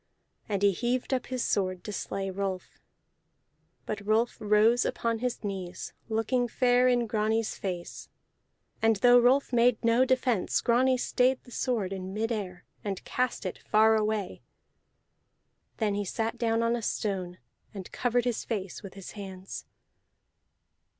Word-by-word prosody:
And 200 Hz, -1 st, -1 dB
he 200 Hz, -, +6 dB
heaved 245 Hz, +6 st, -1 dB
up 255 Hz, -, -1 dB
his 255 Hz, -2 st, -2 dB
sword 185 Hz, -2 st, 0 dB
to 210 Hz, -, -6 dB
slay 195 Hz, 0 st, -3 dB
Rolf. 190 Hz, -1 st, -4 dB, 1.1 s
But 210 Hz, -1 st, -4 dB
Rolf 220 Hz, +3 st, +1 dB
rose 215 Hz, +3 st, +4 dB
upon 230 Hz, -1 st, -1 dB
his 250 Hz, -1 st, -3 dB
knees, 190 Hz, -3 st, -5 dB, 0.2 s
looking 230 Hz, +3 st, +1 dB
fair 245 Hz, +1 st, +3 dB
in 245 Hz, -1 st, +3 dB
Grani's 220 Hz, 0 st, 0 dB
face; 180 Hz, -3 st, -6 dB, 0.7 s
and 225 Hz, 0 st, +4 dB
though 245 Hz, +4 st, +6 dB
Rolf 255 Hz, +2 st, +3 dB
made 240 Hz, -1 st, +4 dB
no 230 Hz, +2 st, +5 dB
defence, 255 Hz, -5 st, +1 dB
Grani 255 Hz, +2 st, +3 dB
stayed 255 Hz, +1 st, +1 dB
the 245 Hz, -, -16 dB
sword 225 Hz, -7 st, -1 dB
in 190 Hz, 0 st, -6 dB
midair, 210 Hz, -5 st, -3 dB, 0.2 s
and 195 Hz, -3 st, -4 dB
cast 250 Hz, -4 st, -1 dB
it 185 Hz, -, -4 dB
far 220 Hz, +1 st, +4 dB
away. 215 Hz, -2 st, -1 dB, 1.4 s
Then 215 Hz, -3 st, 0 dB
he 205 Hz, 0 st, -1 dB
sat 225 Hz, +4 st, -2 dB
down 230 Hz, -1 st, +1 dB
on 230 Hz, +1 st, +2 dB
a 240 Hz, -, -3 dB
stone 190 Hz, -5 st, -2 dB, 0.3 s
and 195 Hz, -4 st, -8 dB
covered 245 Hz, -1 st, 0 dB
his 245 Hz, -2 st, -1 dB
face 195 Hz, -5 st, -4 dB
with 195 Hz, -1 st, -10 dB
his 195 Hz, -2 st, -9 dB
hands. 190 Hz, -2 st, -8 dB
220 Hz, 145 wpm, -28 LUFS, 195-245 Hz, 1.4 s, he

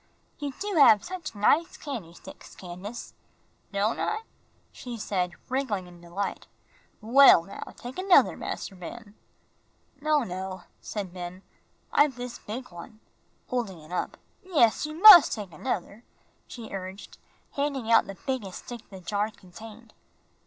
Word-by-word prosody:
"You 290 Hz, -2 st, -3 dB
do 405 Hz, -2 st, -2 dB
have 220 Hz, -8 st, +7 dB
such 355 Hz, -9 st, -7 dB
nice 290 Hz, +11 st, +2 dB
candy 220 Hz, -, -7 dB
sticks, -, -, -13 dB
Candace." 190 Hz, +6 st, -8 dB, 0.6 s
"Don' 205 Hz, +2 st, 0 dB
I?" 435 Hz, +1 st, -2 dB, 0.5 s
she 245 Hz, -2 st, -8 dB
said, 185 Hz, -4 st, -2 dB
wriggling 250 Hz, -8 st, -2 dB
in 175 Hz, -1 st, -15 dB
delight. 175 Hz, +4 st, -5 dB, 0.5 s
"Well, 235 Hz, -5 st, +7 dB
now, 195 Hz, -, -10 dB, 0.2 s
take 250 Hz, +8 st, -8 dB
another, 375 Hz, -1 st, +5 dB
Mas'r 195 Hz, -, -6 dB
Ben." 205 Hz, +4 st, -10 dB, 0.9 s
"No, 305 Hz, -1 st, +2 dB
no," 185 Hz, -1 st, -6 dB, 0.2 s
said 195 Hz, -4 st, -5 dB
Ben, 180 Hz, +1 st, -8 dB, 0.5 s
"I've 290 Hz, -3 st, +4 dB
this 245 Hz, 0 st, -7 dB
big 245 Hz, +3 st, -7 dB
one," 175 Hz, +6 st, -11 dB, 0.5 s
holding 225 Hz, -8 st, -3 dB
it 155 Hz, +2 st, -15 dB
up. 180 Hz, -, -3 dB, 0.2 s
"Yes, 295 Hz, -7 st, +2 dB
you 305 Hz, -, -7 dB
mus' 365 Hz, -2 st, +10 dB
take 205 Hz, -5 st, -5 dB
another," 205 Hz, +3 st, -4 dB, 0.4 s
she 230 Hz, -4 st, -9 dB
urged, 190 Hz, +1 st, -8 dB, 0.3 s
handing 280 Hz, -5 st, -2 dB
out 230 Hz, -, +5 dB
the 195 Hz, -1 st, -8 dB
biggest 230 Hz, -9 st, -4 dB
stick 240 Hz, -2 st, -9 dB
the 190 Hz, -2 st, -11 dB
jar 205 Hz, +4 st, -1 dB
contained. 220 Hz, +3 st, -14 dB
220 Hz, 140 wpm, -27 LUFS, 190-265 Hz, 0.9 s, mus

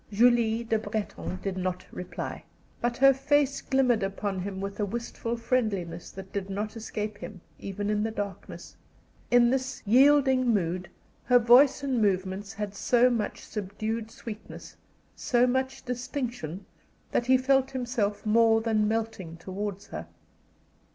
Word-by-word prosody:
Julie 230 Hz, +1 st, +3 dB
Le 220 Hz, -, +3 dB
Breton 210 Hz, -3 st, -4 dB
did 195 Hz, -2 st, -2 dB
not 185 Hz, 0 st, -3 dB
reply, 180 Hz, -, -6 dB, 0.4 s
but 240 Hz, 0 st, 0 dB
her 275 Hz, +1 st, +7 dB
face 280 Hz, +1 st, +1 dB
glimmered 255 Hz, -4 st, +2 dB
upon 195 Hz, 0 st, -2 dB
him 190 Hz, +1 st, -4 dB
with 200 Hz, +1 st, -5 dB
a -, -, +1 dB
wistful 235 Hz, +2 st, -4 dB
friendliness 215 Hz, -9 st, -1 dB
that 190 Hz, 0 st, -10 dB
did 200 Hz, -1 st, -3 dB
not 210 Hz, +3 st, -3 dB
escape 215 Hz, -2 st, -5 dB
him, 210 Hz, -3 st, -8 dB, 0.2 s
even 200 Hz, +1 st, -4 dB
in 210 Hz, 0 st, +1 dB
the 220 Hz, -, 0 dB
darkness. 205 Hz, -4 st, -6 dB, 0.5 s
In 240 Hz, 0 st, +5 dB
this 260 Hz, 0 st, -2 dB
yielding 260 Hz, +1 st, +5 dB
mood 180 Hz, -3 st, -1 dB, 0.4 s
her 250 Hz, 0 st, +6 dB
voice 250 Hz, +4 st, +6 dB
and 260 Hz, -4 st, 0 dB
movements 195 Hz, 0 st, 0 dB
had 210 Hz, -1 st, -4 dB
so 245 Hz, +4 st, +3 dB
much 225 Hz, -4 st, -3 dB
subdued 215 Hz, +2 st, -4 dB
sweetness, 220 Hz, -1 st, -9 dB, 0.4 s
so 245 Hz, 0 st, +2 dB
much 260 Hz, +1 st, -1 dB
distinction, 245 Hz, -, -4 dB, 0.5 s
that 240 Hz, -, 0 dB
he 260 Hz, 0 st, +6 dB
felt 265 Hz, +1 st, +2 dB
himself 235 Hz, -6 st, -2 dB
more 225 Hz, +1 st, +5 dB
than 220 Hz, -2 st, +1 dB
melting 220 Hz, -7 st, -3 dB
towards 195 Hz, +3 st, -5 dB
her. -, -, -6 dB
220 Hz, 145 wpm, -28 LUFS, 200-245 Hz, 0.5 s, her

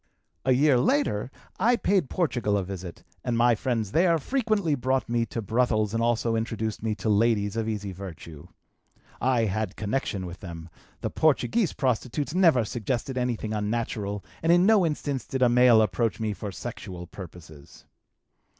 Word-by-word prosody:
"A 130 Hz, -, +4 dB
year 135 Hz, 0 st, +4 dB
later 130 Hz, -, +1 dB, 0.3 s
I 235 Hz, +6 st, +4 dB
paid 190 Hz, -, +1 dB
Portugal 120 Hz, -, 0 dB
a 100 Hz, -, -1 dB
visit 90 Hz, -2 st, -8 dB, 0.2 s
and 120 Hz, -2 st, -1 dB
my 120 Hz, 0 st, +5 dB
friends 115 Hz, -3 st, -2 dB
there 170 Hz, +3 st, +3 dB
frequently 215 Hz, -, 0 dB
brought 130 Hz, 0 st, 0 dB
me 115 Hz, 0 st, 0 dB
to 115 Hz, +1 st, -4 dB
brothels 110 Hz, -1 st, +1 dB
and 115 Hz, -, 0 dB
also 115 Hz, 0 st, +1 dB
introduced 110 Hz, -1 st, -3 dB
me 110 Hz, -1 st, -1 dB
to 110 Hz, -, -5 dB
ladies 105 Hz, -1 st, +2 dB
of 110 Hz, -1 st, -1 dB
easy 105 Hz, -2 st, -3 dB
virtue. 85 Hz, -5 st, -9 dB, 0.7 s
I 125 Hz, -2 st, +2 dB
had 105 Hz, -1 st, -2 dB
connection 105 Hz, -3 st, -2 dB
with 90 Hz, +1 st, -8 dB
them; 85 Hz, -2 st, -8 dB, 0.3 s
the -, -, -2 dB
Portuguese 165 Hz, +6 st, +2 dB
prostitutes 130 Hz, +3 st, -1 dB
never 165 Hz, -11 st, +4 dB
suggested 120 Hz, +4 st, -3 dB
anything 120 Hz, -4 st, -2 dB
unnatural 105 Hz, -2 st, -2 dB, 0.2 s
and 165 Hz, -, +3 dB
in 175 Hz, +1 st, +5 dB
no 205 Hz, -5 st, +5 dB
instance 145 Hz, -3 st, -3 dB
did 130 Hz, -1 st, 0 dB
a 125 Hz, -, +5 dB
male 120 Hz, -2 st, +6 dB
approach 115 Hz, +3 st, -1 dB
me 110 Hz, -2 st, -1 dB
for 100 Hz, 0 st, -6 dB
sexual 90 Hz, -1 st, -7 dB
purposes. 80 Hz, -5 st, -12 dB
115 Hz, 160 wpm, -26 LUFS, 105-135 Hz, 0.7 s, male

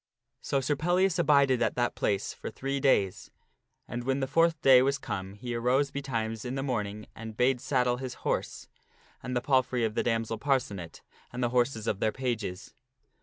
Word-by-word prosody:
So 140 Hz, -1 st, 0 dB
Sir 145 Hz, +3 st, 0 dB
Pellias 180 Hz, +4 st, +2 dB
abided 140 Hz, -6 st, +4 dB
at 110 Hz, -, +1 dB
that 120 Hz, -1 st, 0 dB
place 100 Hz, -2 st, -1 dB
for -, -, -7 dB
three 135 Hz, +1 st, -3 dB
days. 100 Hz, -9 st, +1 dB, 0.6 s
And 120 Hz, +1 st, -4 dB
when 135 Hz, +2 st, 0 dB
the 135 Hz, -, 0 dB
fourth 165 Hz, +3 st, +2 dB
day 130 Hz, -2 st, +8 dB
was 140 Hz, +2 st, +1 dB
come 95 Hz, -6 st, -5 dB
he 120 Hz, +3 st, -5 dB
arose 125 Hz, +4 st, +1 dB
betimes 115 Hz, -5 st, -3 dB
in 125 Hz, +1 st, -4 dB
the 135 Hz, -, -2 dB
morning 105 Hz, -5 st, -3 dB
and 110 Hz, -1 st, -8 dB
bade 125 Hz, 0 st, +2 dB
saddle 125 Hz, -3 st, +1 dB
his 130 Hz, -1 st, -6 dB
horse, -, -, -2 dB, 0.5 s
and 125 Hz, -, -4 dB
the 125 Hz, -, +1 dB
palfrey 130 Hz, -2 st, +1 dB
of 110 Hz, -, -2 dB
the -, -, 0 dB
damsel 115 Hz, -1 st, -1 dB
Parcenet, 125 Hz, -, -2 dB, 0.3 s
and 125 Hz, +1 st, -3 dB
the 120 Hz, -, +2 dB
horses 120 Hz, -2 st, +1 dB
of 105 Hz, -4 st, -1 dB
their 110 Hz, -, +1 dB
pages. 110 Hz, -8 st, -4 dB
125 Hz, 185 wpm, -29 LUFS, 115-135 Hz, 0.6 s, day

